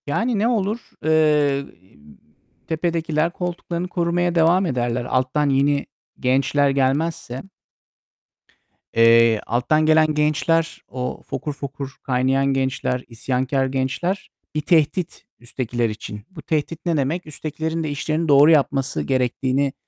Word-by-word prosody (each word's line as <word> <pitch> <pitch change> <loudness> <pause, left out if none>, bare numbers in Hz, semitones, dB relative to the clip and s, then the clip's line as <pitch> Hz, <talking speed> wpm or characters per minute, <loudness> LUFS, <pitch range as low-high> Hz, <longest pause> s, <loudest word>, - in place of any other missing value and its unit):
Yani, 225 - 0
ne 220 - +2
olur, 220 -1 -1 0.2
eee, 150 -3 +3 1.0
tepedekiler 165 -1 0
koltuklarını 175 0 -4
korumaya 175 0 0
devam 170 +3 +4
ederler. 120 -5 -1
Alttan 130 +4 +1
yeni 140 +1 +2 0.3
gençler 135 +2 +2
gelmezse 135 -1 -1 1.5
eee, 115 -1 +5
alttan 140 +7 +1
gelen 155 0 +4
gençler, 155 +2 +1
o 125 0 -4
fokur 150 - -4
fokur 140 -1 -7
kaynayan 130 +1 +1
gençler, 130 -2 -1
isyankâr 130 +3 -1
gençler 135 +9 -2 0.3
bir 150 - 0
tehdit 165 +2 +1
üsttekiler 120 -1 -2
için. 105 -1 -7
Bu 170 -4 -10
tehdit 160 +2 -3
ne 170 -2 +1
demek? 150 +6 -1
Üsttekilerin 160 +2 -4
de 155 - -2
işlerini 155 +3 -2
doğru 145 +2 +7
yapması 140 -3 +1
gerektiğini, 130 +1 0
145 Hz, 115 wpm, -22 LUFS, 130-165 Hz, 1.5 s, doğru